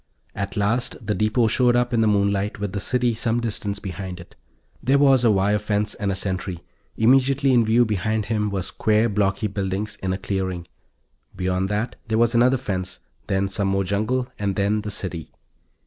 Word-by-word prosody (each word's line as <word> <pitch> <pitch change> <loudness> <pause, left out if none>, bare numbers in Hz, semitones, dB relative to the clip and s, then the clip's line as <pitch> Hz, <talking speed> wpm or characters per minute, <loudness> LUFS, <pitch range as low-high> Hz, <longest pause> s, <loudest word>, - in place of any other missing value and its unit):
At 100 0 -4
last 115 +3 0
the 105 - 0
depot 110 +3 +2
showed 120 +2 +3
up 125 0 +1
in 115 - +3
the 110 - +3
moonlight 100 0 +1
with 100 -2 -3
the 100 - -2
city 125 +2 0
some 115 +1 -1
distance 105 -3 -3
behind 95 -2 -6
it. 85 - -13 0.5
There 135 +3 +3
was 135 -3 +5
a 115 - +5
wire 100 +1 +2
fence, 105 0 -1
and 100 -1 -2
a - - -1
sentry, 95 -2 -3 0.3
immediately 135 +3 +4
in 120 -2 +5
view 115 +2 +4
behind 110 0 -1
him 105 -1 0
were 100 -2 -2
square 110 +5 +1
blocky 100 0 0
buildings 100 +1 -3
in 95 - -3
a 95 - -1
clearing. 95 -3 -3 0.7
Beyond 95 +1 -1
that 105 +4 -2
there 110 0 0
was 115 +1 +3
another 125 +3 +4
fence, 95 -6 -4 0.3
then 95 0 +1
some 100 0 -2
more 95 0 +1
jungle, 110 +7 -1
and 100 -2 -1
then 105 +1 +1
the 105 - -5
city. 90 -5 -4
105 Hz, 190 wpm, -23 LUFS, 95-115 Hz, 0.7 s, was